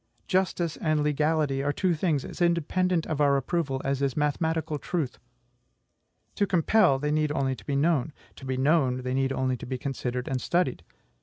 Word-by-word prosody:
Justice 180 -3 0
and 155 -2 +1
legality 150 -1 +1
are 145 +1 0
two 180 +4 +1
things 155 -4 0
as - - -8
independent 170 +1 +1
of 155 -2 -2
our 140 -1 +4
approval 140 -1 -1
as 135 0 0
is 140 0 0
mathematical 155 +1 0
truth. 155 -3 -3 1.1
To 200 - 0
compel, 180 -3 +3
they 150 +2 -1
need 155 0 +1
only 135 -2 0
to - - -15
be 140 - -1
known; 155 0 +1 0.3
to 135 - -10
be 130 -1 -2
known, 130 -3 +2
they 125 0 -2
need 135 0 +1
only 130 -1 0
to - - -8
be 130 0 -3
considered 125 -2 -3
and 130 -2 -2
studied. 135 - 0
150 Hz, 180 wpm, -27 LUFS, 135-165 Hz, 1.1 s, our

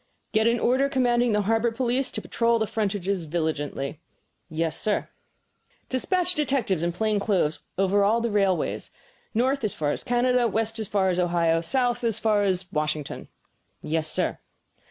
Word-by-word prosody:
"Get 220 0 +3
an 235 0 +2
order 260 +4 +2
commanding 245 -3 +2
the 210 -1 +2
harbor 225 +3 +1
police 250 +3 0
to - - -5
patrol 235 0 +1
the 220 - 0
frontages 200 -4 -2
vigilantly." 150 -2 -3 0.5
"Yes, 160 0 -1
sir." 210 +4 -1 0.8
"Despatch 360 +7 +1
detectives 265 - 0
in 170 0 0
plain 210 +4 0
clothes 190 -7 +1 0.2
over 195 +1 +3
all 215 +4 +3
the 235 -1 -1
railways, 195 -3 0 0.5
north 260 +3 +1
as 215 - -1
far 145 -2 0
as - - -4
Canada, 245 0 +2
west 225 +1 -1
as 215 - -3
far 190 -1 +1
as 180 0 0
Ohio, 170 -2 +2
south 245 +6 +1
as 225 -2 +1
far 215 -2 +2
as 185 -1 0
Washington." 150 -1 -2 0.6
"Yes, 155 0 0
sir." - - -1
210 Hz, 160 wpm, -25 LUFS, 175-240 Hz, 0.8 s, Get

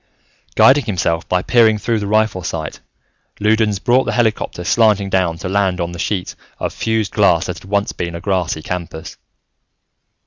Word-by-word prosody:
Guiding 135 0 +5
himself 85 -5 -1
by 90 0 +1
peering 110 -3 +4
through 115 +2 -1
the 100 - -4
rifle 110 -2 +1
sight, 80 -3 -5 0.6
Loudons 105 0 +2
brought 120 +6 +2
the - - -2
helicopter 110 -6 -1
slanting 105 0 +2
down 90 -3 +1
to 85 - -6
land 95 -1 0
on 85 0 -2
the 85 - -8
sheet 90 0 -2 0.2
of - - -3
fused 110 -2 -1
glass - - +3
that - - -5
had 95 - -15
once 100 +2 0
been 85 -1 -5
a - - -5
grassy 90 -4 -2
campus. 85 -3 -6
100 Hz, 170 wpm, -18 LUFS, 90-110 Hz, 0.6 s, Guiding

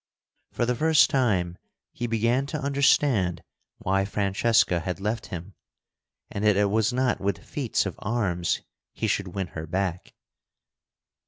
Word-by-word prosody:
For 120 - 0
the 125 - +1
first 160 +3 +4
time 95 -10 +1 0.3
he 120 - -4
began 115 +4 +1
to 150 +1 -3
understand 140 - +2 0.3
why 95 +1 +1
Francesca 100 -1 +2
had 90 +3 -4
left 105 +3 -2
him, 85 -2 -7 0.8
and 100 - -3
that 105 -2 +4
it 100 -1 +2
was 110 0 +2
not 125 0 0
with 100 -2 0
feats - - -1
of - - -5
arms 95 -7 -1 0.3
he - - -2
should 100 - 0
win 95 -3 -2
her 80 0 -7
back. 90 +1 -3
100 Hz, 145 wpm, -26 LUFS, 95-120 Hz, 0.8 s, first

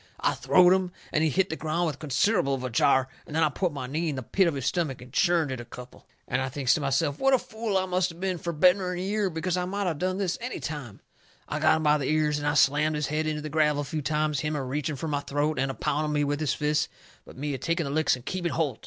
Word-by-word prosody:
I - - +1
throwed 180 -1 +5
him, 185 -1 0 0.2
and 155 - +2
he 160 - +3
hit 190 +4 +1
the - - -1
ground 160 +2 -1
with 150 -4 -3
considerable 155 - +1
of 130 - -6
a 130 - -3
jar, 130 +2 +3 0.2
and 150 - -7
then 160 - +3
I 155 - +4
put 175 +5 -1
my 140 -3 -5
knee 155 +6 -2
in 145 - -2
the 130 - -4
pit 190 - +2
of 165 - 0
his 135 -3 -4
stomach 160 -8 -1
and 125 +1 -13
churned 170 -5 +2
it 130 - -4
a - - -6
couple. 125 +1 -12 0.2
And 125 +1 0
I 130 - -2
thinks 130 -1 +1
to 155 - 0
myself 140 +1 0
what 270 0 +4
a - - +4
fool 220 -4 -3
I 190 - +1
must 180 0 0
of 165 0 -11
been 185 -2 -2
fur 170 - -3
better'n 180 +3 +3
a - - -4
year, 200 +1 0
because 170 +2 -2
I 180 - 0
might 200 +2 -2
of 165 -5 -1
done 185 +1 -1
this 190 -3 -1
any 250 +2 -4
time. 145 -9 -6 0.5
I - - -3
got - - +4
him 160 - -3
by 150 0 +4
the 135 - -2
ears 150 -1 +1
and 145 - -2
I 145 - +1
slammed 150 +2 +3
his 150 -1 -1
head 155 +2 -1
into 150 -1 -2
the 155 - -4
gravel 150 -1 +2
a - - -7
few 155 +2 -3
times, 150 0 0
him 150 +1 -2
a 140 - -2
reaching 145 +3 -2
fur 150 +4 -5
my 145 -2 0
throat, 145 0 -1
and 135 +1 +1
a 135 - -4
pounding 150 0 -1
me 145 0 +2
with 145 0 -1
his 155 -3 0
fists, 150 0 0 0.3
but - - -14
me 145 +1 -3
a 135 - -4
taking 170 +5 0
the 140 - -4
licks 155 -2 +2
and 125 - -13
keeping 175 -3 -2
holt. 145 -8 -1
155 Hz, 295 wpm, -27 LUFS, 140-175 Hz, 0.5 s, throwed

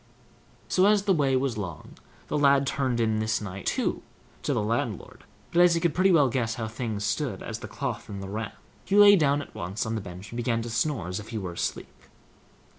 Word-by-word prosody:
'" - - -31
So, 185 +1 +3
as 205 -1 +4
the 200 -1 +3
way 140 -5 +2
was 130 -4 0
long, 85 -6 -6 0.4
the - - -3
lad 140 -1 +4
turned 130 -3 -1
in 110 -1 +1
this 110 0 0
night 95 -2 -7
too - - 0 0.4
to - - -1
the - - 0
landlord; 110 -2 -3 0.3
but 175 - +4
as 175 -1 +6
he - - +1
could 165 -2 +1
pretty 190 +1 +4
well 150 -6 +5
guess 115 -2 -1
how 110 -2 -3
things 110 -2 -4
stood 105 0 -2
as - - -5
to - - -21
the - - -6
cloth - - -4
and 100 -1 -6
the 95 - -6
ram, 110 +2 -4 0.3
he 195 - -1
lay 205 0 +9
down 145 -4 +2
at - - -16
once 95 +4 -3
on 110 - -2
the 110 - -2
bench 95 +2 -9
and 115 - -6
began 115 -1 0
to 120 - -6
snore, 115 - -1
as 90 +2 -3
if 105 - -10
he 115 - -4
were 90 -4 -4
asleep. - - -4
115 Hz, 240 wpm, -27 LUFS, 105-145 Hz, 0.4 s, lay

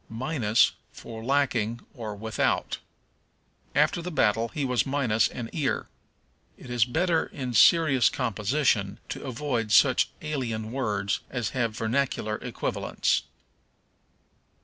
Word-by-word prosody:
Minus 115 -2 +2 0.2
for 110 -1 -9
Lacking, 120 -4 0
or 110 -4 -6
Without. 110 +2 -1 1.0
"After 155 +3 +3
the 180 - -5
battle 115 -7 +2
he 140 +4 -3
was 125 -2 +1
minus 130 -6 +2
an 120 -2 -6
ear." 145 -5 -1 0.7
It 125 - -10
is 120 -3 +3
better 165 +6 +1
in 130 -3 -5
serious 140 -3 +5
composition 110 -3 0
to - - -5
avoid 125 -4 -2
such 130 +3 +5
alien 115 -8 -3
words 105 -6 -1
as 120 -4 -2
have 115 -4 -2
vernacular 110 -2 -1
equivalents. - - -1
120 Hz, 115 wpm, -27 LUFS, 110-140 Hz, 1.0 s, serious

